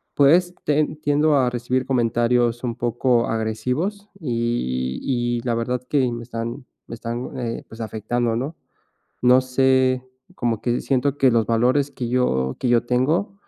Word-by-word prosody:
pues, 175 Hz, +6 st, +4 dB
te 150 Hz, 0 st, +3 dB, 0.2 s
tiendo 145 Hz, +1 st, +3 dB
a 125 Hz, -2 st, +3 dB
recibir 125 Hz, +1 st, -1 dB
comentarios 120 Hz, -1 st, +1 dB
un 120 Hz, -2 st, -2 dB
poco 120 Hz, 0 st, +1 dB
agresivos 125 Hz, -, -2 dB
y 115 Hz, -, -2 dB
y 120 Hz, -2 st, -1 dB
y -, -, -7 dB
la 120 Hz, -1 st, +1 dB
verdad 125 Hz, +2 st, -1 dB
que 130 Hz, -4 st, +2 dB
me 120 Hz, 0 st, -5 dB
están 115 Hz, +3 st, -5 dB, 0.2 s
me 115 Hz, -, -6 dB
están, 120 Hz, +3 st, -5 dB
eh, 115 Hz, -1 st, -4 dB
pues, 115 Hz, +1 st, -9 dB
afectando, 115 Hz, +2 st, -1 dB
¿no? 140 Hz, +7 st, -3 dB, 0.7 s
No 125 Hz, +1 st, +6 dB
sé, 130 Hz, 0 st, +2 dB, 0.3 s
como 115 Hz, -3 st, -1 dB
que 120 Hz, 0 st, 0 dB
siento 140 Hz, +1 st, 0 dB
que 130 Hz, -2 st, +4 dB
los 115 Hz, -1 st, +2 dB
valores 125 Hz, +5 st, +2 dB
que 120 Hz, -3 st, -4 dB
yo 65 Hz, -, +1 dB
que 125 Hz, -, 0 dB
yo 120 Hz, -1 st, +4 dB
tengo 150 Hz, -, +1 dB
125 Hz, 160 wpm, -22 LUFS, 115-130 Hz, 0.7 s, No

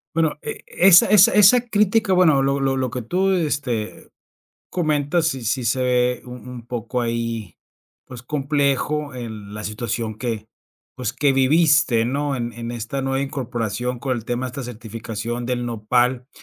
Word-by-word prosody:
Bueno, 160 Hz, -2 st, +1 dB
e -, -, -6 dB
esa 180 Hz, -1 st, +6 dB
esa 195 Hz, -1 st, +6 dB
esa 210 Hz, +4 st, +6 dB
crítica, 210 Hz, -1 st, +2 dB
bueno, 155 Hz, -7 st, +4 dB
lo 140 Hz, +1 st, +1 dB
lo 135 Hz, -1 st, 0 dB
lo 130 Hz, -2 st, -1 dB
que 125 Hz, -1 st, -4 dB
tú, 185 Hz, -, 0 dB
este, 145 Hz, -, -2 dB, 0.6 s
comentas. 155 Hz, -1 st, 0 dB
Sí 135 Hz, -6 st, -2 dB
sí 125 Hz, +2 st, -1 dB
se 130 Hz, +3 st, +1 dB
ve 125 Hz, -1 st, +1 dB
un 125 Hz, 0 st, -10 dB
un 120 Hz, -2 st, -9 dB
poco 120 Hz, 0 st, -3 dB
ahí, 115 Hz, -4 st, -3 dB, 0.5 s
pues, 125 Hz, -2 st, -10 dB
complejo 145 Hz, +1 st, -1 dB
en 110 Hz, -5 st, -8 dB
la 105 Hz, -, -6 dB
situación 110 Hz, 0 st, -3 dB
que, 110 Hz, -3 st, -4 dB, 0.5 s
pues, 125 Hz, -2 st, -3 dB
que 140 Hz, +1 st, +2 dB
viviste, 135 Hz, -3 st, +3 dB
¿no?, 140 Hz, +2 st, -1 dB
en 120 Hz, -1 st, -4 dB
en 115 Hz, +1 st, -6 dB
esta 120 Hz, +3 st, -4 dB
nueva 135 Hz, 0 st, -1 dB
incorporación 125 Hz, -3 st, -3 dB
con 130 Hz, -1 st, -2 dB
el 115 Hz, -, -7 dB
tema 120 Hz, +2 st, -2 dB
de -, -, -6 dB
esta 135 Hz, +2 st, -6 dB
certificación 115 Hz, 0 st, -6 dB
del 120 Hz, -1 st, -2 dB
Nopal, 120 Hz, +3 st, 0 dB
125 Hz, 165 wpm, -21 LUFS, 115-145 Hz, 0.6 s, esa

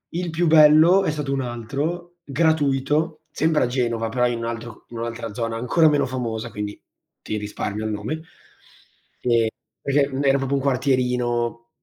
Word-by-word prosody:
Il 175 Hz, -1 st, -2 dB
più 165 Hz, +1 st, 0 dB
bello 160 Hz, +4 st, +7 dB
è 155 Hz, -, +1 dB
stato 145 Hz, -2 st, -3 dB
un 135 Hz, -, 0 dB
altro, 145 Hz, +9 st, -4 dB
gratuito, 155 Hz, +1 st, +1 dB
sempre 155 Hz, 0 st, +1 dB
a 125 Hz, -, +1 dB
Genova, 120 Hz, -3 st, -1 dB
però 125 Hz, +2 st, +1 dB
in 120 Hz, -1 st, -2 dB
un 115 Hz, -, -4 dB
altro 115 Hz, -1 st, -6 dB
c -, -, -39 dB
in 115 Hz, -, -6 dB
un'altra 115 Hz, -2 st, -5 dB
zona, 115 Hz, -1 st, -3 dB
ancora 155 Hz, +7 st, +3 dB
meno 145 Hz, -2 st, +2 dB
famosa, 120 Hz, -3 st, -4 dB
quindi, 105 Hz, 0 st, -6 dB, 0.4 s
ti 110 Hz, -, -4 dB
risparmio 105 Hz, 0 st, -4 dB
il 110 Hz, -, -2 dB
nome. 110 Hz, +10 st, -4 dB, 1.0 s
E 115 Hz, -2 st, +2 dB, 0.3 s
perché 140 Hz, 0 st, +2 dB
era 135 Hz, 0 st, +4 dB
proprio 135 Hz, +1 st, 0 dB
un 135 Hz, -, -3 dB
quartierino, 125 Hz, -3 st, 0 dB
130 Hz, 165 wpm, -23 LUFS, 115-150 Hz, 1.0 s, bello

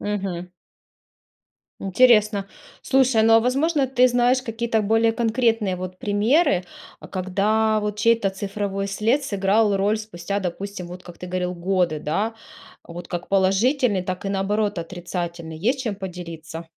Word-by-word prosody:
Мгм. 190 Hz, -4 st, -4 dB, 1.3 s
Интересно. 210 Hz, -1 st, +3 dB, 0.4 s
Слушай, 260 Hz, -4 st, +3 dB
ну, 225 Hz, 0 st, +5 dB
а 225 Hz, -, +7 dB
возможно, 275 Hz, +4 st, +1 dB
ты 255 Hz, -1 st, +4 dB
знаешь 245 Hz, +1 st, +2 dB
какие-то 225 Hz, -2 st, -1 dB
более 225 Hz, +2 st, +3 dB
конкретные 225 Hz, -4 st, +1 dB
вот 185 Hz, 0 st, -7 dB
примеры, 210 Hz, -, +2 dB, 0.3 s
а, -, -, -12 dB
когда 210 Hz, +4 st, +1 dB
вот 210 Hz, 0 st, -3 dB
чей-то 230 Hz, -2 st, +3 dB
цифровой 195 Hz, 0 st, -3 dB
след 225 Hz, +8 st, 0 dB
сыграл 205 Hz, -1 st, +2 dB
роль 200 Hz, +3 st, +1 dB
спустя, 200 Hz, -2 st, -4 dB
допустим, 185 Hz, 0 st, -5 dB
вот 180 Hz, +1 st, -9 dB
как 175 Hz, -2 st, -12 dB
ты 180 Hz, -, -8 dB
говорил, 180 Hz, 0 st, -2 dB
годы, 175 Hz, -2 st, 0 dB
да, 200 Hz, +10 st, -2 dB, 0.5 s
вот 175 Hz, +1 st, -9 dB
как 175 Hz, 0 st, -5 dB
положительный, 200 Hz, +3 st, +2 dB
так 185 Hz, +1 st, -4 dB
и, -, -, 0 dB
наоборот, 205 Hz, +1 st, -1 dB
отрицательный, 170 Hz, -1 st, -5 dB
есть 245 Hz, -, 0 dB
чем 225 Hz, -5 st, -2 dB
поделиться? 170 Hz, -4 st, -8 dB
200 Hz, 140 wpm, -23 LUFS, 185-225 Hz, 1.3 s, а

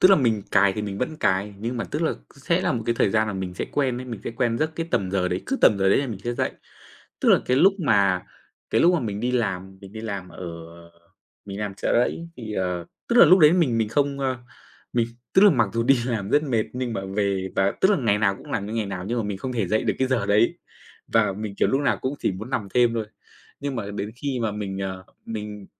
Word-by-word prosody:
tức 185 Hz, -, +8 dB
là, 195 Hz, -, +8 dB
mình 115 Hz, -, +1 dB
cài 100 Hz, -1 st, +4 dB
thì 105 Hz, -, -4 dB
mình 100 Hz, -1 st, -4 dB
vẫn 155 Hz, +5 st, -2 dB
cài. 100 Hz, -5 st, 0 dB
Nhưng 115 Hz, +4 st, -3 dB
mà, 115 Hz, -, -2 dB
tức -, -, -3 dB
là, -, -, +1 dB, 0.2 s
sẽ -, -, 0 dB
là -, -, +1 dB
một -, -, -2 dB
cái 115 Hz, -, +2 dB
thời 100 Hz, -, +3 dB
gian 110 Hz, +1 st, +2 dB
là 105 Hz, -, -3 dB
mình 95 Hz, -2 st, -4 dB
sẽ -, -, -3 dB
quen 130 Hz, -4 st, 0 dB
ấy, -, -, -6 dB
mình 115 Hz, -5 st, -7 dB
sẽ -, -, -3 dB
quen 115 Hz, -1 st, 0 dB
giấc 155 Hz, +1 st, 0 dB
cái 165 Hz, 0 st, -3 dB
tầm 95 Hz, -9 st, 0 dB
giờ 95 Hz, -2 st, 0 dB
đấy, 90 Hz, +1 st, -2 dB
cứ 270 Hz, -, -1 dB
tầm 105 Hz, -, +5 dB
giờ 95 Hz, 0 st, +3 dB
đấy 95 Hz, -, +4 dB
là 140 Hz, -, -1 dB
mình 110 Hz, -6 st, -5 dB
sẽ 120 Hz, 0 st, -1 dB
dậy. -, -, -1 dB, 0.7 s
Tức -, -, +2 dB
là, -, -, +7 dB
cái 125 Hz, -, +2 dB
lúc 185 Hz, +8 st, +6 dB
mà 100 Hz, -, +3 dB, 0.5 s
cái -, -, +3 dB
lúc 175 Hz, +2 st, +5 dB
mà 170 Hz, -, +1 dB
mình 105 Hz, -3 st, -3 dB
đi 125 Hz, +2 st, 0 dB
làm, 95 Hz, -5 st, -2 dB
mình 100 Hz, -1 st, -12 dB
đi 110 Hz, -, -7 dB
làm 100 Hz, -4 st, -5 dB
ở, -, -, -14 dB, 0.6 s
à, 85 Hz, -, -28 dB, 0.5 s
mình 100 Hz, -1 st, -7 dB
đi -, -, -5 dB
làm 105 Hz, -2 st, -3 dB
Chợ -, -, -1 dB
Rẫy 165 Hz, +7 st, 0 dB
thì, 110 Hz, -3 st, -6 dB
ờ 90 Hz, -2 st, -2 dB, 0.2 s
tức 235 Hz, -, +1 dB
là, -, -, +10 dB
lúc 180 Hz, +5 st, +7 dB
đấy 155 Hz, -2 st, +7 dB
mình 155 Hz, -10 st, +2 dB
mình 110 Hz, -1 st, +1 dB
không, 140 Hz, +3 st, 0 dB
a 130 Hz, -2 st, -1 dB, 0.5 s
mình, 120 Hz, -1 st, +1 dB, 0.3 s
tức 190 Hz, -, +6 dB
là, 210 Hz, -, +8 dB
mặc 120 Hz, -, +2 dB
dù 115 Hz, -, 0 dB
đi 130 Hz, +2 st, +4 dB
làm 110 Hz, -5 st, -2 dB
rất 150 Hz, -, +4 dB
mệt, 120 Hz, -7 st, 0 dB
nhưng 125 Hz, -1 st, -3 dB
mà 115 Hz, -, -2 dB, 0.2 s
về 100 Hz, -2 st, 0 dB
và, 95 Hz, +1 st, +3 dB
tức 190 Hz, -, +5 dB
là, 205 Hz, -, +4 dB
ngày 110 Hz, -6 st, +2 dB
nào 100 Hz, -2 st, +2 dB
cũng 145 Hz, -, -13 dB
làm 100 Hz, -6 st, -1 dB
như 105 Hz, -, -6 dB
ngày 110 Hz, -2 st, -1 dB
nào 95 Hz, -2 st, -5 dB
nhưng 120 Hz, +1 st, -1 dB
mà 115 Hz, -, -1 dB
mình 100 Hz, -2 st, -4 dB
không 130 Hz, +5 st, -4 dB
thể 115 Hz, -5 st, -1 dB
dậy 110 Hz, +3 st, +1 dB
được -, -, +1 dB
cái 130 Hz, -, +1 dB
giờ 130 Hz, -3 st, 0 dB
đấy. 105 Hz, +3 st, +3 dB, 0.5 s
Và -, -, +2 dB
mình, 105 Hz, +1 st, -6 dB
kiểu, -, -, +2 dB
lúc 135 Hz, -, +1 dB
nào 145 Hz, -, +1 dB
cũng 130 Hz, +2 st, -1 dB
chỉ -, -, 0 dB
muốn 110 Hz, +7 st, -7 dB
nằm 110 Hz, -6 st, -2 dB
thêm 120 Hz, -2 st, +4 dB
thôi. 110 Hz, -2 st, -2 dB, 0.5 s
Nhưng 140 Hz, -2 st, -3 dB
mà 100 Hz, -3 st, -4 dB
đến 105 Hz, +1 st, -4 dB
khi 135 Hz, 0 st, -3 dB
mà 110 Hz, -2 st, 0 dB
mình, 100 Hz, -2 st, -4 dB
ờ, 95 Hz, -1 st, -4 dB, 0.2 s
mình, 105 Hz, -2 st, -6 dB
110 Hz, 280 wpm, -24 LUFS, 100-130 Hz, 0.7 s, là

